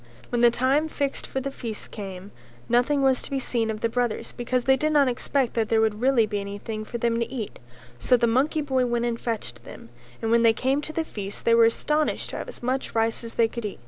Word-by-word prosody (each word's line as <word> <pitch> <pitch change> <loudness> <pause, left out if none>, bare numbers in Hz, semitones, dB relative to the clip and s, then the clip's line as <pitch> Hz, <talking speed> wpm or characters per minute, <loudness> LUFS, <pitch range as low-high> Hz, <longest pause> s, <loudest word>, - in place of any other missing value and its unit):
When 240 -1 0
the 240 - +7
time 265 +6 +1
fixed 280 -2 -3
for 265 - -3
the 275 +1 -3
feast 230 -5 -6
came, 195 -1 -7 0.4
nothing 265 +4 +2
was 265 -1 +3
to - - -7
be 275 - -1
seen 235 -4 0
of 215 -1 -4
the - - +2
brothers 240 -1 -2
because 250 0 -1
they 265 +1 +5
did 305 +4 0
not 290 -3 +4
expect 255 +1 0
that 225 -2 0
there 225 - +3
would 220 -1 +1
really 255 -3 +4
be 210 -1 -2
anything 205 +2 -5
for 235 +2 -5
them 235 0 0
to 235 +1 -2
eat; 235 -6 -5 0.4
so 250 - +4
the 235 - +2
monkey 265 +7 +2
boy 260 -3 +1
went 240 0 0
and 235 -1 -1
fetched 215 - -4
them, 115 - -12 0.3
and 225 - -1
when 235 0 +5
they 230 -1 +5
came 265 +5 0
to 310 - -6
the 320 0 -2
feast 200 -7 -6
they 230 - +5
were 230 0 +7
astonished 300 +6 0
to - - -5
have - - -5
as - - -10
much 255 +1 -2
rice 225 +1 +1
as 230 - -8
they 230 - +4
could 235 +1 -6
eat. 210 - -4
235 Hz, 250 wpm, -25 LUFS, 225-265 Hz, 0.4 s, the